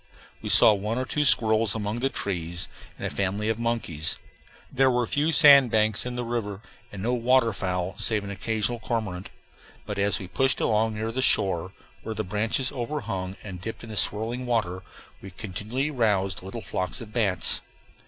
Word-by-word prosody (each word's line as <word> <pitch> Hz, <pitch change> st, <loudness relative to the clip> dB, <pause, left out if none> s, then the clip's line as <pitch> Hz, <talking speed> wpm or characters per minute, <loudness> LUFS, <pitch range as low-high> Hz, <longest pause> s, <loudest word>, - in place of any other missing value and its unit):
We -, -, -5 dB
saw 110 Hz, -, +7 dB
one 105 Hz, +3 st, -3 dB
or 130 Hz, -, -1 dB
two 150 Hz, +2 st, 0 dB
squirrels 110 Hz, -5 st, +3 dB
among 105 Hz, +1 st, -3 dB
the 135 Hz, +2 st, 0 dB
trees, 85 Hz, -7 st, -3 dB, 0.3 s
and -, -, -6 dB
a -, -, -2 dB
family 100 Hz, +2 st, -1 dB
of 110 Hz, 0 st, -1 dB
monkeys. 115 Hz, -10 st, -1 dB, 0.5 s
There 135 Hz, 0 st, +3 dB
were 125 Hz, -1 st, +1 dB
few 150 Hz, +6 st, 0 dB
sand 140 Hz, -5 st, +7 dB
banks 110 Hz, +1 st, +1 dB
in 125 Hz, -, -4 dB
the 125 Hz, -, -3 dB
river, 115 Hz, -4 st, -3 dB, 0.3 s
and 95 Hz, -2 st, -7 dB
no 120 Hz, +2 st, 0 dB
water 120 Hz, -1 st, +3 dB
fowl 90 Hz, -1 st, -2 dB
save 110 Hz, -3 st, +2 dB
an 100 Hz, -, -6 dB
occasional 110 Hz, +3 st, -1 dB
cormorant. 105 Hz, -6 st, -4 dB, 0.6 s
But 105 Hz, -1 st, -4 dB
as 100 Hz, +1 st, +2 dB
we 95 Hz, -, -7 dB
pushed 135 Hz, +9 st, +1 dB
along 110 Hz, 0 st, +1 dB
near 110 Hz, +1 st, -3 dB
the 130 Hz, +3 st, -2 dB
shore, 95 Hz, -7 st, +1 dB, 0.3 s
where 110 Hz, -, -6 dB
the 110 Hz, -, -2 dB
branches 110 Hz, +7 st, 0 dB
overhung 115 Hz, -8 st, -4 dB
and 90 Hz, -4 st, -8 dB
dipped 110 Hz, +4 st, -7 dB
in 115 Hz, -, -9 dB
the -, -, -6 dB
swirling 115 Hz, +6 st, +2 dB
water, 95 Hz, -6 st, -1 dB, 0.4 s
we 95 Hz, -, -9 dB
continually 110 Hz, +9 st, -4 dB
roused 100 Hz, -, 0 dB
little 95 Hz, +5 st, -7 dB
flocks 95 Hz, -1 st, -3 dB
of 110 Hz, -2 st, -10 dB
bats. 100 Hz, -7 st, +2 dB
110 Hz, 185 wpm, -26 LUFS, 95-120 Hz, 0.6 s, saw